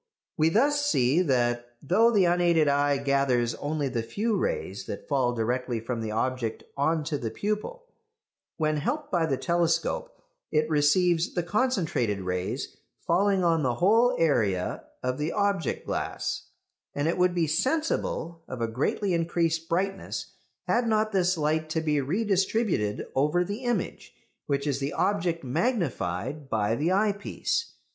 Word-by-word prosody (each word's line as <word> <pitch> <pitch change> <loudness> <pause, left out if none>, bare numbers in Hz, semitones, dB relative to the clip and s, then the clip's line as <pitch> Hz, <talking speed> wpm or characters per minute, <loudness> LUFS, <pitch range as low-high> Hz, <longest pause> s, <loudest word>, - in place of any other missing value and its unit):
We 160 -1 +3
thus 285 - +2
see 145 - +3
that 120 -5 0
though 210 +11 +4
the 205 -5 +4
unaided 170 -3 +3
eye 145 0 +3
gathers 135 -4 +1
only 145 +3 -2
the 125 -3 -1
few 215 - -1
rays 475 +2 -2
that - - -6
fall 130 -4 +2
directly 120 +1 -1
from 115 +1 -4
the 110 - -3
object 115 +1 -2
on 155 +3 +1
to 150 -2 -2
the 115 - -3
pupil, 215 - -3 0.7
when 155 -1 +1
helped 295 - -2
by 170 -3 +2
the 135 -4 0
telescope 170 - 0 0.4
it 155 0 +2
receives 160 +3 +2
the 175 - 0
concentrated 170 - 0
rays 90 0 -3 0.3
falling 190 +2 +2
on 165 -2 +3
the 125 -4 0
whole 225 - +4
area 110 - +1 0.2
of 125 +1 -1
the 150 +2 -1
object 200 -4 0
glass; - - -3 0.5
and 145 +2 0
it 165 - +1
would 180 0 +3
be 170 -2 +2
sensible 170 - -1
of 125 - -6
a 115 - 0
greatly 145 - -1
increased 165 -1 0
brightness 195 +3 -2 0.3
had 240 0 +1
not 215 -1 +2
this 185 -2 +2
light 155 +1 0
to 160 - 0
be 150 -2 +1
redistributed 190 - 0
over 150 +6 +2
the 205 +7 -5
image, 240 -7 -2 0.3
which 140 0 0
is 140 -2 0
the 140 +1 -2
object 170 -5 0
magnified 140 - -2
by 110 -2 +1
the 155 +7 0
eyepiece. 205 - 0
160 Hz, 150 wpm, -27 LUFS, 135-195 Hz, 0.7 s, though